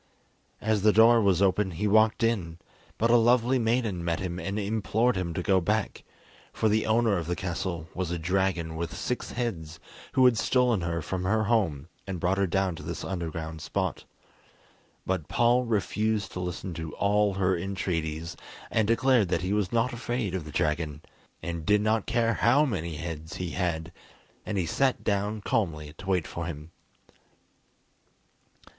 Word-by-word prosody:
As 110 -1 +1
the 105 +2 +5
door 115 +2 +6
was 100 -2 +3
open 95 +1 +2
he 105 +3 0
walked 110 +2 +4
in, 95 -8 0 0.4
but 115 +1 +2
a 120 - +7
lovely 120 +2 +3
maiden 115 -6 0
met 85 -1 -1
him 90 -2 -4
and 95 +4 -3
implored 110 +3 +1
him 90 -2 -2
to 90 - -2
go 95 -1 +3
back, 105 +4 -1 0.5
for 110 - 0
the 110 +1 +1
owner 110 -3 +3
of 80 - -5
the 90 - -1
castle 85 -2 -3
was 90 -2 -3
a 85 - -2
dragon 85 -1 0
with 85 +1 -4
six 125 - -3
heads, 85 -10 -4 0.3
who 130 - +5
had 125 -3 +5
stolen 125 -6 +2
her 85 -1 -2
from 90 +4 -3
her 110 +3 +2
home 95 -10 0 0.2
and 95 -2 -4
brought 95 +2 +1
her 100 - +2
down 95 0 0
to - - -8
this 80 +2 -5
underground 80 -3 -4
spot. - - -2 1.0
But 90 -5 -2
Paul 120 +1 +3
refused 110 -2 0
to - - -6
listen 90 0 -4
to 80 -1 -6
all 105 0 +2
her 95 -1 +2
entreaties, 85 -3 -3 0.4
and 110 -2 +2
declared 115 -2 +3
that 90 - 0
he 95 +2 0
was 105 -3 0
not 120 +1 +1
afraid 120 -4 -2
of 90 -5 -3
the 75 - -8
dragon, 75 0 -1 0.4
and 85 -2 -4
did 105 +4 +3
not 110 0 +1
care 115 -1 +2
how 130 +8 +4
many 85 - -3
heads 80 0 -6
he 90 -2 -4
had; 85 -2 -2 0.6
and 105 -1 -2
he 90 - +1
sat 130 +10 +1
down 105 +1 -1
calmly 80 - -1
to 95 - -9
wait 90 -4 +1
for 85 -1 -5
him. 80 -1 -7
95 Hz, 175 wpm, -27 LUFS, 85-110 Hz, 1.0 s, a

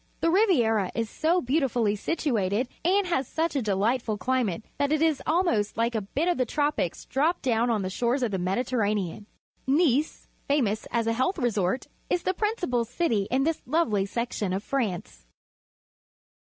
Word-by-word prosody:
The 330 - +3
Ri^'iera 240 - +3
is 230 -1 -2
so 340 +3 +1
beautifullj' 250 -6 +1
situated 235 - 0 0.2
and 385 +4 +3
has 305 -7 0
such 325 -1 -1
a 275 - +1
delightful 215 +2 0
climate 240 -6 -1 0.2
that 285 0 +1
it 310 - +2
is 320 -2 +2
almost 310 - +1
like 230 +1 +1
a 220 - 0
bit 275 - -2
of 350 -6 +1
the 255 - +3
tropics 290 - -1
dropped 315 +6 0
down 240 -2 +2
on 215 -4 +1
the 185 - -2
shores 245 +6 0
of 235 - 0
the 190 - -1
^Mediterranean. 205 -1 -1 0.4
jNicfj 295 0 +2 0.2
famous 235 -7 +1
as 235 -1 0
a 230 - +1
health 260 +11 0
resort, 220 - 0 0.2
is 355 - 0
the 370 - +1
principal 365 - 0
city 230 - 0
in 265 +2 +2
this 325 +2 0
lovely 230 -10 +1
section 215 -4 -2
of 195 +2 -2
France. 210 - -3
245 Hz, 170 wpm, -26 LUFS, 210-310 Hz, 0.4 s, The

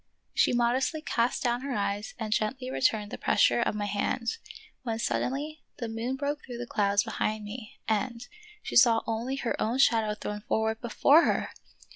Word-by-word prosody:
She - - +3
modestly 250 +6 +1
cast 240 -2 0
down 240 -1 +1
her 275 -2 -3
eyes 200 +1 -2
and 215 -2 -1
gently 255 +5 -1
returned 215 -6 +1
the - - -6
pressure - - +3
of 225 - 0
my 205 -1 -2
hand, 220 - -1 0.4
when 230 -3 -2
suddenly 285 +6 -2 0.2
the 235 - -4
moon 225 +3 -3
broke 290 +2 -3
through 245 -2 -7
the 245 - -4
clouds 205 -3 +2
behind 215 -1 -2
me 215 +2 -8
and 230 +2 -1 0.2
— 425 0 -22
she - - -5
saw 235 -2 +6
only 230 +4 -2
her 265 -3 -1
own 230 +4 0
shadow 225 -5 +3
thrown 210 0 -5
forward 220 0 -1
before 275 +7 +5
her! - - 0
235 Hz, 180 wpm, -28 LUFS, 215-260 Hz, 0.4 s, saw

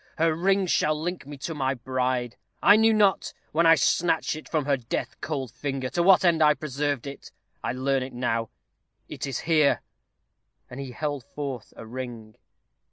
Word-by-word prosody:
Her 165 0 +3
ring 190 +4 +2
shall 155 -3 +1
link 175 -2 -4
me 145 -1 -8
to 165 +5 -5
my 135 -2 -1
bride. 125 -1 -2 0.2
I 205 - +7
knew 225 +1 +5
not, 210 -3 +2 0.2
when 165 +2 +3
I 165 - +8
snatched 160 +3 +1
it 155 - -10
from 155 -4 0
her 140 -1 +2
death 125 +1 -5
cold 140 -5 -3
finger, 135 -2 -4
to 175 - 0
what 185 +1 +5
end 165 -2 +3
I 150 -1 +6
preserved 145 -3 -2
it. 140 0 -9 0.3
I - - -1
learn 135 +1 0
it 130 +1 -5
now. 115 -2 -1 0.6
It - - -5
is 135 -3 -3
here." 155 -3 +3 0.9
And 125 - -7
he 135 -1 -5
held 145 -1 -3
forth 135 -4 -6
a 115 - -9
ring. 115 -2 -7
140 Hz, 180 wpm, -26 LUFS, 130-160 Hz, 0.9 s, I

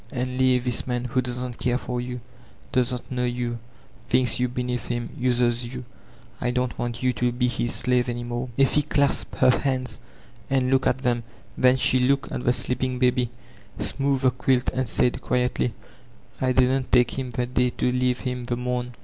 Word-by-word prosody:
And 130 -1 -3
leave 130 -1 +3
this 125 0 -1
man, 125 -1 -1
who 130 +1 +1
doesn't 125 -1 -4
care 125 -1 +1
for 125 -1 -3
you, 125 0 -5 0.5
doesn't 125 0 -1
know 125 -1 -1
you, 120 -1 -2 0.5
thinks 125 -1 +3
jrou 125 -1 +1
beneath 125 -1 -2
him, 120 -1 -3
uses 120 -1 +1
jrou. 125 +1 -6 0.6
I - - +1
don't 125 0 -1
want 120 0 -3
you 125 0 +3
to 125 0 0
be 125 +1 0
his 120 0 -1
shive 125 0 +2
any 120 0 -3
more." 120 +1 -3
Effie 140 +2 +4
clasped 140 -1 +1
her 130 -1 +5
hands 130 -4 -2 0.5
and 130 -1 +2
fooked 130 -1 +3
at - - +2
them; 120 -1 +1 0.3
then 125 0 +5
she 130 0 +3
hxdced 135 +2 +1
at - - -3
the 125 - +5
sleeping 125 +1 -1
baby, 125 -1 +2 0.5
smoothed 135 -1 0
the 130 - +5
quilt, 125 0 +1
and 130 -2 -1
said 125 +2 +1
quietly: 125 -1 0 0.7
"I 130 -1 +2
didna 130 +1 +3
take 125 +1 +3
him 130 -1 -3
the 125 +1 -1
day 125 0 +1
to 125 - 0
leave 125 0 +1
him 125 -2 -3
the 120 - -1
morra. 125 0 -2
125 Hz, 190 wpm, -25 LUFS, 120-130 Hz, 0.7 s, her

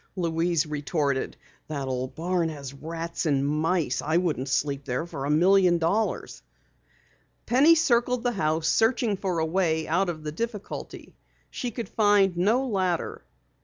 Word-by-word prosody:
Louise 170 -2 0
retorted. 145 -2 -2 0.3
"That 140 -3 -4
old 130 0 -3
barn 170 0 0
has 140 -4 -7
rats 165 +4 -4
and 140 -2 +1
mice. 155 -2 0
I 155 +2 +1
wouldn't 155 -7 -1
sleep 140 +1 -1
there 125 +3 -2
for 140 -5 -6
a - - -2
million 180 +3 +4
dollars." 195 +7 -1 1.0
Penny 285 +7 +5
circled 250 -5 +2
the 245 - +1
house, 160 -6 0
searching 225 -1 +2
for 185 -2 -2
a 160 - +1
way 160 -2 0
out 180 +4 +1
of 155 -3 -5
the 150 - -4
difficulty. 215 +4 -6 0.4
She 245 - -3
could 235 0 -5
find 205 -4 +3
no 220 +9 +2
ladder. 185 -6 -1
170 Hz, 150 wpm, -26 LUFS, 150-200 Hz, 1.0 s, Penny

